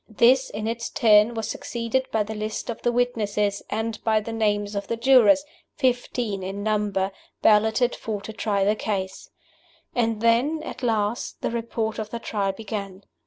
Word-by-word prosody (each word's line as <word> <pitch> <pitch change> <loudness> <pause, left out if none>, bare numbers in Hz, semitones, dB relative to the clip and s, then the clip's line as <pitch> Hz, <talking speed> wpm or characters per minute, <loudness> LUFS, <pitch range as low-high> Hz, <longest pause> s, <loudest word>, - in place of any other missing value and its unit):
This, 245 +4 +4
in 210 +1 -5
its 235 +1 -3
turn, 215 +1 +4
was 225 -2 -3
succeeded 235 +3 -2
by 220 -1 +2
the 215 +1 -6
list 215 +2 -4
of 230 - -8
the 240 - +1
witnesses, 210 -4 0
and 220 0 -3
by 220 -1 +3
the 225 +2 -6
names 205 -2 0
of 200 -1 -3
the 230 - -2
jurors 265 +3 +5 0.3
(fifteen 245 -6 -1
in 195 +2 -5
number) 205 -3 0 0.3
balloted 220 +3 +4
for 215 -2 -4
to 220 - -8
try 205 -2 0
the 205 +2 +3
case. 195 -3 -4 0.6
And 225 -3 0
then, 245 +8 +2
at - - -7
last, 220 -2 -1
the - - 0
Report 230 -1 -2
of 215 -1 -4
the 235 - -4
Trial 205 -4 -1
began. 200 -2 -6
220 Hz, 170 wpm, -24 LUFS, 205-235 Hz, 0.6 s, jurors